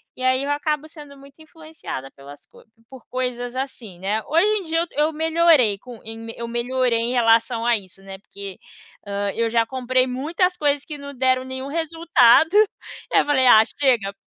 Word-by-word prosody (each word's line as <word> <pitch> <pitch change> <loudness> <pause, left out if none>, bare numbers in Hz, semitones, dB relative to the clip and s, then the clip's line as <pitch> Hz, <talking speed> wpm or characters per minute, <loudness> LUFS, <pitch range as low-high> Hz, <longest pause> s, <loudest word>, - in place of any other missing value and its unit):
e - - -12
aí 260 +1 +2
eu 285 - -2
acabo 300 +1 -2
sendo 295 -3 -13
muito 275 +2 -17
influenciada 315 - -9
pelas 140 +1 -14
co - - -20 0.3
por 265 -2 -14
coisas 250 -1 -4
assim, 250 -8 -6
né, 205 +4 -1
hoje 330 +3 +2
em 400 - -5
dia 325 0 -1
eu 340 - -1 0.2
eu 320 - -5
melhorei 320 -8 +3
com, 240 +2 -12
eu 225 +1 -8
me 235 0 -2
melhorei 250 -2 0
em 230 +1 -1
relação 230 -1 +2
a 240 -1 +3
isso, 195 -1 -11
né, 195 0 -9
porque, 200 -1 -10 0.5
hã, 200 0 -2
eu 230 0 0
já 230 0 +2
comprei 255 +1 0
muitas 330 +8 -1
coisas 290 -2 0
que 300 - -8
não 280 0 -9
deram 255 0 +1
nenhum 260 +1 -6
resultado, 320 -3 +3 0.6
eu - - +5
falei: 260 -3 +2
"Ah 220 -3 +8
chega". 235 -5 0
255 Hz, 185 wpm, -22 LUFS, 230-290 Hz, 0.6 s, Ah